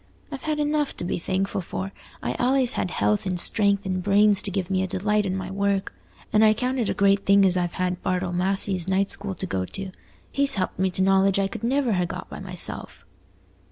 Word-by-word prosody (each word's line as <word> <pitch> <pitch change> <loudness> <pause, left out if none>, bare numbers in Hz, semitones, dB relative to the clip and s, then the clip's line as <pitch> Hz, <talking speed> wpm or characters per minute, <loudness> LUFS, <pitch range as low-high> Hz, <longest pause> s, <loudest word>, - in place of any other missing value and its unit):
I've 275 -2 -6
had 305 +1 -2
enough 295 -1 0
to - - -4
be 175 - -2
thankful 190 +2 -1
for: 190 +2 -5 0.3
I've - - -2
allays 255 0 +2
had - - -2
health 105 - 0
and 180 -1 -1
strength 200 +1 +1
and 185 -1 -1
brains 205 +1 +4
to - - 0
give 190 -1 -3
me 190 -1 +1
a 190 - -1
delight 205 +2 0
in 185 - -1
my 190 0 -5
work; 200 0 -1 0.4
and 215 0 +5
I 215 0 +5
count 255 +3 -1
it 230 - 0
a - - -1
great 200 0 +4
thing 200 0 +5
as 185 -1 +4
I've 175 -1 -1
had 185 -1 -2
Bartle 180 -1 -1
Massey's 190 0 +1
night 190 +1 +1
school 200 -1 -3
to - - -3
go 95 -1 -2
to. 190 - -7 0.4
He's 280 0 +1
helped 185 -2 -2
me 190 0 +2
to 185 +1 -1
knowledge 195 0 +3
I 195 -1 +2
could 195 - -8
never 255 -1 +1
ha' 180 -2 0
got 180 +2 -7
by - - -7
myself." 185 -2 -3
195 Hz, 230 wpm, -24 LUFS, 185-210 Hz, 0.4 s, and